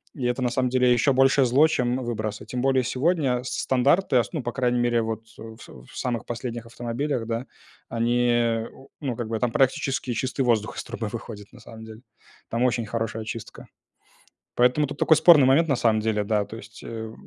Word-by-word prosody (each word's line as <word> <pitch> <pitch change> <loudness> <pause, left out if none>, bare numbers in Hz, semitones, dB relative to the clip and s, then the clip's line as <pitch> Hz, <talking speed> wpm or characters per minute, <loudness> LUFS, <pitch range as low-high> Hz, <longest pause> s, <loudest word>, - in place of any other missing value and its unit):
и 130 - -4
это, 125 +1 -1
на 125 - +1
самом 125 +1 0
деле, 125 -1 +3
ещё 125 +3 +3
большее 135 +1 +4
зло, 135 +6 +5
чем 125 -5 0
выбросы. 110 -3 -4
Тем 125 +2 -4
более 130 -1 +2
сегодня 130 -1 0
с 125 - -5 0.2
стандарты, 140 +4 +3
а 120 - +4
с - - -13
ну, 155 - -2
по 120 - -3
крайней 125 -1 0
мере, 120 -1 +2
вот, 110 0 -4 0.2
э, - - -13
в 110 - -12
в - - -14
самых 120 -4 -3
последних 120 -1 -5
автомобилях, 120 +2 -3
да, 115 +3 -3 0.4
они, 120 -1 +1
у 135 +1 -16
ну, 130 -5 -2
как 120 -2 -4
бы, 110 -1 -3
там 125 -2 0
практически 135 -1 0
чистый 130 +3 -2
воздух 115 -4 0
из - - -4
трубы 110 - -5
выходит, 105 -2 -9
на - - -14
самом 110 0 -12
деле. 110 +1 -12 0.5
Там 115 +2 -1
очень 120 -2 +1
хорошая 115 0 -3
очистка. 110 +1 -8 0.9
Поэтому 125 +4 +3
тут 145 - -8
такой 160 - +5
спорный 155 -5 +7
момент, 155 +5 +4
на 140 - +3
самом 110 -3 +2
деле, 105 -1 0
да, 105 0 0
то 115 - -9
есть. 115 +1 -13
Э, 110 -1 -7
120 Hz, 210 wpm, -24 LUFS, 115-130 Hz, 0.9 s, спорный